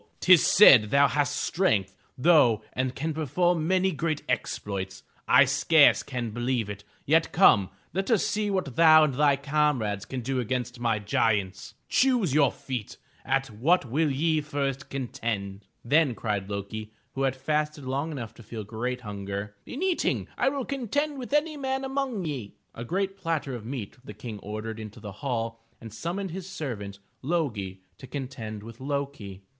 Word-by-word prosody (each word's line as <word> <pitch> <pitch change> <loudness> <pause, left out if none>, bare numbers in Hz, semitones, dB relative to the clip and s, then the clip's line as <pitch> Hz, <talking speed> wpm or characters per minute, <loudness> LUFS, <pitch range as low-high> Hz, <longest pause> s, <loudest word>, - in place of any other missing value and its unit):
Tis 185 -3 +6
said 125 - +8
thou 140 +3 +5
hast 145 -2 0
strength, 110 - 0 0.2
though, 125 -8 +4
and 130 0 -2
can 160 +3 -2
perform 160 +2 0
many 190 +1 +2
great 155 -1 -2
exploits! 100 -5 -3 0.2
I - - +7
scarce - - +5
can 120 -3 -4
believe 120 -2 -1
it! 100 0 -9 0.2
Yet 160 +3 +3
come, 100 - +5 0.2
let 195 +5 -2
us 225 -5 +3
see 210 0 -1
what 185 -11 -2
thou 155 -1 +7
and 150 -3 +1
thy 145 +1 +4
comrades 140 -8 0
can 130 +1 -5
do 130 +2 -2
against 125 0 -3
my 115 -2 +1
giants. 105 -2 -1
Choose 245 - +2
your 150 -1 +5
own - - -2
feat. 125 -5 -6 0.3
At 135 -1 0
what 140 +10 +2
will 150 +6 +1
ye 155 +3 +1
first 140 -2 -3
contend?" 110 -6 -4 0.2
Then 140 -1 +3
cried 105 -4 -3
Lo'ki 105 +2 -5 0.2
who 135 - -4
had 135 -1 +1
fasted 150 +2 -1
long 140 +5 -2
enough 120 -7 -6
to - - -15
feel 110 0 -7
great 120 +4 -4
hunger: 100 -1 -5
*Tn 285 +8 -5
eating 375 -3 0
will 270 +1 +1
I - - -3
contend 280 +3 -2
with 250 - -7
any 300 +1 +1
man 265 -1 -2
among 265 -7 -2
ye." 130 -10 -5 0.2
A 115 - -7
great 195 +8 -2
platter 160 -6 -2
of 115 -3 -7
meat 125 -5 -6
the 105 - -10
King 105 0 -7
ordered 110 +2 -6
into 110 0 -9
the 105 -1 -8
hall, 115 -4 -3 0.2
and 115 -3 -10
summoned 175 - -4
his 190 +1 -7
servant, 115 - -5 0.2
Lo'gi, 115 - -2 0.2
to 130 - -10
contend 125 -6 -6
with 115 +1 -11
Lo'ki. 135 -8 -4
135 Hz, 170 wpm, -27 LUFS, 110-165 Hz, 0.3 s, said